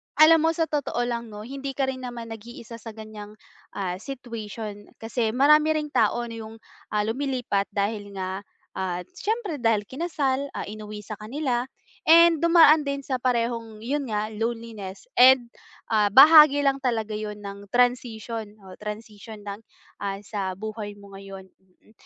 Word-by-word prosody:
alam 320 +1 +7
mo 325 - +1
sa 330 - +1
totoo 290 -6 -1
lang 235 -1 -3
no, 210 -1 -9
hindi 270 +3 -6
ka 265 -1 0
rin 260 - -8
naman 240 -2 -7
nag-iisa 230 +1 -9
sa 225 -1 -10
ganyang, 215 -1 -10 0.4
ah, 185 -2 -3
situation 220 -4 -7
kasi 225 0 -2
marami 300 +3 +5
ring 300 -1 -2
tao 240 - +2
na 230 -1 -7
yung, 220 0 -9 0.4
ah, 210 - +2
lumilipat 245 -4 -1
dahil 205 0 -2
nga 190 0 -3 0.4
at 180 -1 -3
siyempre 405 -4 -3
dahil 225 -3 +2
kinasal, 280 -2 -1
ah, - - -3
inuwi 210 0 -8
sa 215 0 -8
kanila 250 +2 -2 0.4
and 335 0 +7
dumaan 325 -3 +7
din 280 0 -2
sa 260 -1 -2
parehong 230 -3 -1
yun 280 +2 -2
nga 215 -1 -2
loneliness 225 -3 -5 0.2
and, 250 -2 +7 0.4
ah, 210 -2 +4
bahagi 290 +5 +8
lang 275 -1 +2
talaga 225 -4 -1
yun 210 0 -4
ng 200 0 -8
transition 230 -3 0
o 185 -1 -11
transition 210 0 -8
ng, 200 0 -6 0.4
ah, 195 -1 -3
sa 195 -3 -4
buhay 210 0 -6
mo 200 -1 -15
ngayon, 195 -1 -10
mm. 190 +2 -29
230 Hz, 160 wpm, -25 LUFS, 210-270 Hz, 0.4 s, bahagi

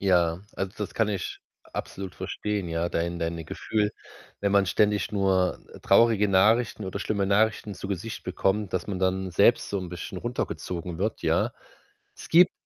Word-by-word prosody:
Ja, 90 -3 +3 0.2
also, 95 0 -2
das 105 - -4
kann 115 -2 +2
ich 95 -4 -3 0.3
absolut 95 -1 -5
verstehen, 100 0 -3
ja, 85 +1 -1
dein 85 +1 -2
deine 85 0 -3
Gefühl, 105 +5 -1 0.5
wenn 100 -1 +1
man 100 -1 +4
ständig 105 +1 +2
nur, 95 -2 +2
äh, - - -12
traurige 110 -3 +4
Nachrichten 105 +3 +3
oder 95 +1 -4
schlimme 100 -1 0
Nachrichten 105 0 +2
zu - - -7
Gesicht 100 +3 -4
bekommt, 95 +2 0
dass 90 -2 -1
man 100 -3 -3
dann 95 0 0
selbst 100 +7 +4
so 100 - 0
'n 90 -1 -5
bisschen 90 +1 -6
runtergezogen 90 -7 -4
wird, 105 +3 -2
ja? - - +2 0.6
Es - - -10
gibt 175 +2 +6
95 Hz, 170 wpm, -27 LUFS, 90-105 Hz, 0.6 s, gibt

